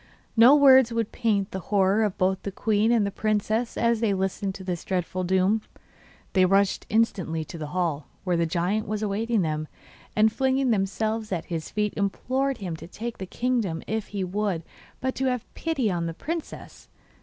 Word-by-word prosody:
No 240 +5 +8
words 265 -4 +7
would 230 -2 -1
paint 205 -4 0
the 190 - -3
horror 200 +1 +3
of 205 -3 -1
both 190 0 +1
the 200 - -4
queen 215 +2 +1
and 230 -4 +3
the 200 - -2
princess 215 +3 -1
as 235 -1 +2
they 215 -3 +1
listened 190 0 -2
to 190 - -8
this 180 -2 -3
dreadful 185 0 -2
doom. 190 +4 +2 0.7
They 185 - +4
rushed 195 +1 +2
instantly 185 -8 0
to 170 +2 -9
the 155 - -4
hall, 160 -4 -2 0.2
where 180 -2 +1
the 170 0 +1
giant 180 +6 -1
was 215 +1 -2
awaiting 215 +1 0
them, 155 -1 -2 0.5
and 215 0 +4
flinging 265 -1 +1
themselves 215 +2 -1
at 170 -3 -2
his 160 -1 -3
feet 210 -1 -1
implored 260 +7 -1
him 180 -5 -4
to - - -10
take 230 +6 -6
the 190 - -5
kingdom 230 -8 -1
if 220 -1 -3
he 200 -2 -3
would, 190 -2 -1 0.4
but 260 0 -1
to 265 - -2
have 250 -3 -1
pity 275 -10 -1
on 170 -2 -1
the 165 - -5
princess. 330 - -6
205 Hz, 190 wpm, -26 LUFS, 185-230 Hz, 0.7 s, No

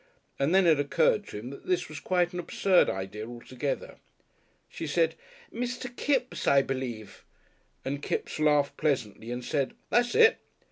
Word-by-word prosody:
And 140 +1 +2
then 190 -1 +5
it 160 -4 +5
occurred 145 +8 +2
to - - -7
him 120 +5 -7
that 140 - -11
this 180 -1 +1
was 155 0 -8
quite 180 -1 +1
an 180 - -3
absurd 185 +2 +3
idea 95 +3 -4
altogether. 125 +3 -5 0.7
She 160 - -6
said 160 +2 +2 0.4
"Mr. 245 +1 -4
Kipps, 260 -2 -1
I 140 0 +5
believe," 125 -6 -5 0.6
and 140 +1 -3
Kipps - - -3
laughed 150 -2 +3
pleasantly 120 -7 -1
and 125 0 -4
said, 140 -3 -1 0.2
"That's 240 +1 +2
it!" 455 +1 +6
150 Hz, 155 wpm, -28 LUFS, 130-185 Hz, 0.7 s, it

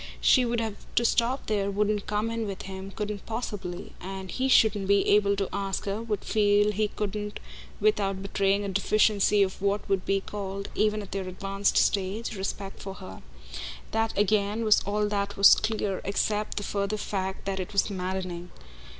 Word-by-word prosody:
She 255 -2 +5
would 235 0 0
have 220 -2 -3 0.2
to 235 - +3
stop 240 +4 +1
there, 200 -2 0
wouldn't 205 0 0
come 210 +2 0
in 230 -1 -2
with 195 -1 -5
him, 190 0 -7
couldn't 210 0 -4
possibly; 205 -6 -5
and 190 0 -6
he 260 +1 0
shouldn't 210 -5 +4
be 200 0 +3
able 200 -1 +4
to 195 -1 -1
ask 195 -1 -2
her, 200 +2 -2
would 215 -3 -3
feel 205 -1 +3
he 210 +1 0
couldn't 210 0 -4 0.4
without 200 -2 +1
betraying 200 0 +1
a - - -2
deficiency 205 +1 +3
of 190 0 -3
what 200 +1 0
would 195 -2 +1
be 195 0 +1
called, 200 0 -5
even 215 0 +1
at 195 - -12
their 195 -1 -3
advanced 195 +2 -1
stage, 200 +4 +1
respect 195 0 -5
for 195 -1 -6
her: 185 0 -10 0.7
that 225 0 0
again 210 +2 +2
was 215 -1 +5
all 210 +1 +1
that 200 -1 -2
was 200 - +9
clear 215 -3 -1
except 210 +1 -1
the 205 - -1
further 200 +1 -1
fact 190 -2 -3
that 195 -1 -2
it 185 - -4
was 200 0 +1
maddening. 180 -2 -4
200 Hz, 180 wpm, -27 LUFS, 195-210 Hz, 0.7 s, was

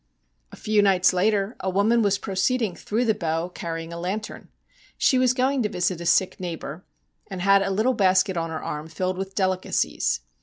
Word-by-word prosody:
A - - -10
few 215 -1 +1
nights 185 -3 +4
later 200 +3 +1
a 190 - -2
woman 210 +5 +2
was 200 -2 +2
proceeding 195 +1 -1
through 230 +4 -2
the 220 - +3
Bow 165 -3 -2
carrying 165 -1 -6
a 170 - -6
lantern. 195 +5 -5 0.5
She 260 - +3
was 255 -1 +4
going 260 +1 +1
to 210 - 0
visit 180 -3 -1
a 170 - -4
sick 190 - +2
neigh 175 -2 -4
bour, 160 +3 -8 0.5
and 190 -2 -6
had 195 +2 +4
a 195 - -1
little 215 +7 +1
basket 190 -2 +2
on 165 -1 -2
her 160 -1 -5
arm 150 +1 -5
filled 185 +3 -3
with 195 0 -5
delicacies. 185 - 0
190 Hz, 195 wpm, -24 LUFS, 175-210 Hz, 0.5 s, nights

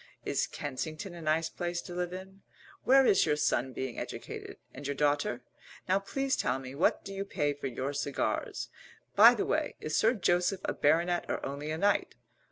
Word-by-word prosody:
Is - - 0
Kensington 155 +6 -5
a 170 - -9
nice 160 +1 +1
place 175 -1 -3
to 180 - -8
live 180 0 -2
in? 190 +1 -9 0.4
Where 270 +1 +6
is 195 - +4
your 150 - +3
son 130 -3 +1
being 130 -1 -4
educated - - -7 0.2
and 140 +1 -7
your 140 - -2
daughter? 145 -3 +1 0.4
Now 190 +1 +3
please 270 +7 -1
tell 125 0 0
me, 130 -1 -8
what 145 - +1
do 195 - -6
you 195 0 -3
pay 150 -7 -1
for 140 -1 -5
your 130 +3 -3
cigars? 140 -1 -2 0.5
By - - +9
the - - -1
way, - - 0
is 155 - -3
Sir 225 +3 +4
Joseph 180 -1 +1
a - - 0
baronet 170 +4 +2
or - - -2
only 140 +2 -4
a 155 - -2
knight? 205 +4 +1
160 Hz, 190 wpm, -31 LUFS, 140-190 Hz, 0.5 s, By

